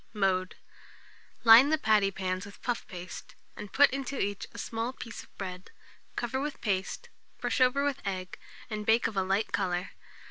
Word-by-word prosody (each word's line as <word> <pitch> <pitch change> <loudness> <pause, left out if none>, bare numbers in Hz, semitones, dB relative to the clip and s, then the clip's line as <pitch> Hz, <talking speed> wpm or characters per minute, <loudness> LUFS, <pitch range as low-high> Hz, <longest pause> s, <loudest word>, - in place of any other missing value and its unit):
Mode. 185 -2 +1 0.9
Line 235 +5 +9
the 315 - +3
patty 215 -6 +3
pans 185 -1 -3
with 200 - -14
puff 245 -2 -2
paste, 180 0 -9 0.2
and 210 -1 -8
put 285 +1 +6
into 275 0 -3
each 200 0 -2
a - - -12
small 230 +2 -3
piece 230 -3 -8
of - - -20
bread: 185 -1 -6 0.5
cover 240 +2 -2
with 295 0 -4
paste, 195 -3 -2 0.3
brush - - -1
over 255 +2 +4
with 285 -1 -1
egg, 185 -2 -4 0.3
and 215 -1 -4
bake 225 +2 +3
of 220 - -1
a 195 - +2
light 195 +3 0
colour. 180 -1 -1
210 Hz, 175 wpm, -30 LUFS, 190-250 Hz, 0.9 s, Line